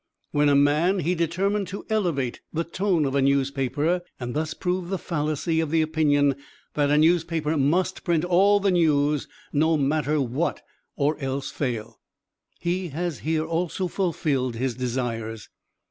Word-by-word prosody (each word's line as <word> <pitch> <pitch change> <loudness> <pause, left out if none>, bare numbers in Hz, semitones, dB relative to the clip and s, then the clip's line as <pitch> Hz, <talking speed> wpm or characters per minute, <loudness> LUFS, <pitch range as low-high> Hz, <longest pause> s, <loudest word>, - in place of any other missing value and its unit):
When 145 0 +3
a 140 - +4
man 150 +7 +3
he 175 0 0
determined 185 +4 0
to 195 +3 -7
elevate 170 - -1
the 165 +1 -1
tone 175 -2 0
of 135 - -1
a 140 - +2
newspaper, 140 +5 +1 0.2
and 120 -1 -4
thus 155 +1 -2
prove 180 -1 -2
the 190 - -1
fallacy 155 0 -1
of 160 -2 0
the 160 +1 +3
opinion 145 -3 +2 0.4
that 145 -1 +1
"A 150 - +4
newspaper 160 -1 +2
must 155 +6 +1
print 170 -1 +1
all 195 +3 +4
the 200 -1 +2
news, 150 -4 +2 0.3
no 160 +2 +3
matter 150 +1 +1
what, 135 +5 -1 0.3
or 150 +1 0
else 135 0 -3
fail"; 120 -6 -4 0.6
he 180 +2 -1
has 165 +1 -3
here 160 0 -1
also 170 +3 -1
fulfilled 150 - -1
his 125 +2 -1
desires. 115 -3 -3
155 Hz, 155 wpm, -25 LUFS, 140-175 Hz, 0.6 s, a